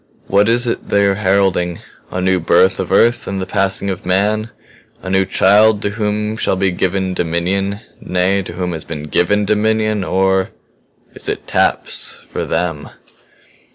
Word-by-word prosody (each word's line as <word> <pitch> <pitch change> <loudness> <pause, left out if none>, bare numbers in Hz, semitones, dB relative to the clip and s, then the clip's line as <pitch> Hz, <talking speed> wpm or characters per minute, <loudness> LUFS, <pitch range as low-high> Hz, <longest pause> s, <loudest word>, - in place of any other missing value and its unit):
What 100 +3 +3
is 120 +1 +2
it 115 - -3
they 100 0 +3
are 100 - +3
heralding? 95 -3 +1 0.3
A 90 - -4
new 95 0 +2
birth 90 +3 +3
of 95 - -3
Earth 120 +1 +3
and 95 0 -3
the 95 - -3
passing 95 +1 0
of 90 - -6
man? 105 +4 0 0.5
A 95 - -4
new 95 0 +2
child 105 +2 +4
to 100 - -1
whom 105 0 -2
shall 95 - 0
be 95 0 +1
given 95 +1 -1
dominion 95 +4 -1 0.2
nay, 90 +2 +1
to 95 - -8
whom 90 -1 -3
has 80 -2 -5
been 75 -3 -6
given 100 +7 +1
dominion? 110 0 +1
Or 95 0 +1 0.6
is - - -5
it - - -4
taps - - -1
for - - -6
Them?" 80 -5 -2
95 Hz, 165 wpm, -17 LUFS, 90-105 Hz, 0.6 s, child